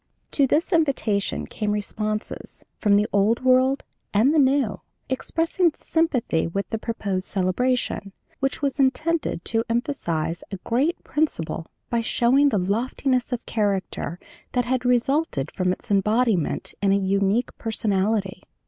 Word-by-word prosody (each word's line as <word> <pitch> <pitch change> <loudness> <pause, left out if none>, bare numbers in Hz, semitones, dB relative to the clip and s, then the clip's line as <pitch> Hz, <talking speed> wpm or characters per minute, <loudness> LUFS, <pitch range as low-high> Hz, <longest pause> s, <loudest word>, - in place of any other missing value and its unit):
"To 280 -2 +3
this 330 +8 +1
invitation 270 -11 +1
came 210 -1 -3
responses, 215 +1 -3 0.2
from 205 -2 +4
the 205 +1 +4
Old 210 +5 +2
World 260 +1 +4 0.3
and 240 +9 +4
the 320 - +4
New, 270 -5 +2 0.3
expressing 330 +5 +1
sympathy 260 - 0
with 195 +4 -3
the 225 - -1
proposed 200 -5 -3
celebration, 200 +2 0 0.3
which 270 +1 -1
was 280 0 0
intended 290 - +1
to 225 0 +1
emphasize 175 - -1
a 195 - -5
great 275 +9 0
principle 165 - -2 0.2
by 235 -1 +2
showing 255 +5 +3
the 220 - +1
loftiness 245 +7 0
of 245 -1 -3
character 195 -4 -2 0.3
that 245 -1 +1
had 255 0 -1
resulted 250 - +1
from 185 -1 0
its 185 - -6
embodiment 210 -2 +1
in 200 -1 +3
a 200 - +4
unique 200 +4 +1
personality. 205 -3 0
230 Hz, 135 wpm, -24 LUFS, 200-265 Hz, 0.3 s, from